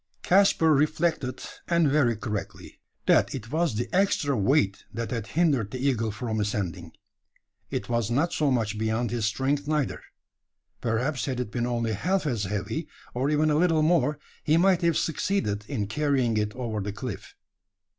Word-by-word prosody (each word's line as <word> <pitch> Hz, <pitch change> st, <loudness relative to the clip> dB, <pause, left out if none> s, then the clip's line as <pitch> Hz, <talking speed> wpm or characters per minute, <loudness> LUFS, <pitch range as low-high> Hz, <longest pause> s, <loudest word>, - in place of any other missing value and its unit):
Caspar 180 Hz, -4 st, +4 dB
reflected, 150 Hz, -2 st, 0 dB, 0.2 s
and 170 Hz, -2 st, +3 dB
very 135 Hz, -5 st, +3 dB
correctly: 105 Hz, -1 st, -6 dB, 0.3 s
that -, -, +3 dB
it 115 Hz, -2 st, -7 dB
was 160 Hz, -5 st, +1 dB
the 120 Hz, -, -2 dB
extra 185 Hz, -8 st, +2 dB
weight 105 Hz, -2 st, +2 dB
that 115 Hz, 0 st, -4 dB
had 115 Hz, -3 st, -3 dB
hindered 140 Hz, -, +2 dB
the 130 Hz, -, -5 dB
eagle 125 Hz, -4 st, 0 dB
from 110 Hz, +1 st, -3 dB
ascending. 90 Hz, -5 st, -3 dB, 0.8 s
It 100 Hz, -, -3 dB
was 115 Hz, -3 st, 0 dB
not 145 Hz, +8 st, +1 dB
so 150 Hz, -2 st, +1 dB
much 110 Hz, -5 st, 0 dB
beyond 110 Hz, +2 st, 0 dB
his 120 Hz, -3 st, -1 dB
strength 140 Hz, +5 st, -1 dB
neither. 150 Hz, -3 st, -1 dB, 0.8 s
Perhaps 125 Hz, +5 st, -1 dB
had 130 Hz, -3 st, -3 dB
it 125 Hz, -4 st, -3 dB
been 120 Hz, +1 st, -1 dB
only 115 Hz, -2 st, -1 dB
half 180 Hz, -, 0 dB
as 115 Hz, -8 st, -1 dB
heavy, 105 Hz, -, -3 dB, 0.3 s
or 130 Hz, +3 st, 0 dB
even 150 Hz, +1 st, +2 dB
a -, -, +2 dB
little 160 Hz, -1 st, +3 dB
more, 155 Hz, -3 st, +2 dB, 0.3 s
he 155 Hz, +2 st, +3 dB
might 185 Hz, 0 st, +4 dB
have 170 Hz, -2 st, +2 dB
succeeded 145 Hz, -, -1 dB
in 110 Hz, -8 st, -2 dB
carrying 130 Hz, 0 st, +1 dB
it 105 Hz, -1 st, -1 dB
over 115 Hz, -4 st, -3 dB
the 100 Hz, +1 st, -3 dB
cliff. 110 Hz, +1 st, -7 dB
125 Hz, 165 wpm, -26 LUFS, 110-150 Hz, 0.8 s, Caspar